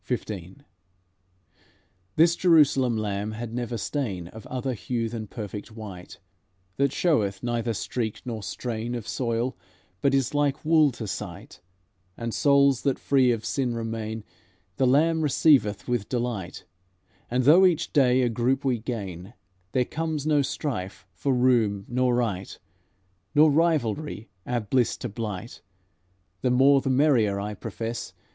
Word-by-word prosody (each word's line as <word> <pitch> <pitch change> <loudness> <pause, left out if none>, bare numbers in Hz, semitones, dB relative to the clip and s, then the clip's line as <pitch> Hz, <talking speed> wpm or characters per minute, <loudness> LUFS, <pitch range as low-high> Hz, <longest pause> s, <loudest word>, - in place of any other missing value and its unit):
XV 125 - 0 1.9
This 170 +2 +5
Jerusalem 140 -9 +4
Lamb 105 0 -2
had 115 +1 -6
never 120 -1 -3
stain 100 - -3
Of 110 +2 -11
other 130 0 -3
hue 115 +1 -2
than 110 -2 -6
perfect 105 +1 -7
white, 100 -5 -9 0.6
That 140 -1 +2
showeth 105 - +1
neither 120 -1 -1
streak 110 +1 -3
nor 115 -3 -4
strain 115 +2 -4
Of 115 -3 -6
soil, 120 0 -1 0.5
but 140 -1 +3
is 135 0 0
like 145 0 0
wool 155 -2 +5
to 115 -1 -6
sight; 95 -3 -7 0.6
And 115 -1 -4
souls 140 -2 +4
that 140 -2 0
free 130 -3 +3
of 115 -2 -2
sin 125 -4 -1
remain 110 -1 -4 0.5
The 130 - +3
Lamb 160 +5 +3
receiveth 140 -8 +3
with 120 -4 -1
delight; 120 -7 -3 0.6
And, 125 +1 +1
though 160 +8 +7
each 170 -4 -1
day 130 -3 +4
a 120 - +2
group 125 +4 0
we 125 -3 +1
gain, 100 -3 -6 0.4
There 125 -1 +1
comes 155 -1 -3
no 150 -2 +3
strife 125 - -4
for 140 - -1
room 120 -6 +2
nor 125 0 +1
right, 105 -6 -2 0.8
Nor 150 +1 +6
rivalry 150 -6 0 0.2
our 120 -1 0
bliss 120 +3 +1
to 120 - -5
blight. 105 0 -6 0.8
The 125 - +1
more 135 +2 +5
the 135 - -2
merrier, 125 -7 +3
I 105 +1 -4
profess. 115 0 -5
120 Hz, 140 wpm, -26 LUFS, 110-140 Hz, 1.9 s, though